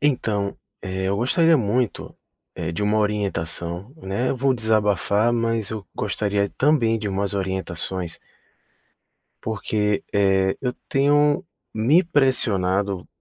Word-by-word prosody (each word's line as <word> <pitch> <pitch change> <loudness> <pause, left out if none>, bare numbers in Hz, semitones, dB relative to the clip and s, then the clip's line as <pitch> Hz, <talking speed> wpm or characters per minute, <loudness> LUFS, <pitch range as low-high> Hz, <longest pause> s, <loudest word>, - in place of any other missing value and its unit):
Então, 110 -8 0 0.2
eh, 95 0 -4
eu 100 - 0
gostaria 165 - +4
muito, 120 +1 -1 0.4
eh, 80 - -3
de 85 - -5
uma 105 +1 +2
orientação, 95 -1 -2
né, 120 -1 -2
eu - - -1
vou 135 +1 +2
desabafar, 110 -1 +2
mas 115 -3 0
eu 110 -3 -5
gostaria 100 -1 0
também 130 -6 +2
de 105 -1 -3
umas 100 +1 -1
orientações 95 -2 -2 1.2
porque, 105 -1 -1
eh, 95 -1 +2
eu 125 -2 -1 0.2
tenho 145 +4 +3 0.3
me 135 +12 +4
pressionado, 100 - +1
105 Hz, 120 wpm, -23 LUFS, 95-125 Hz, 1.2 s, gostaria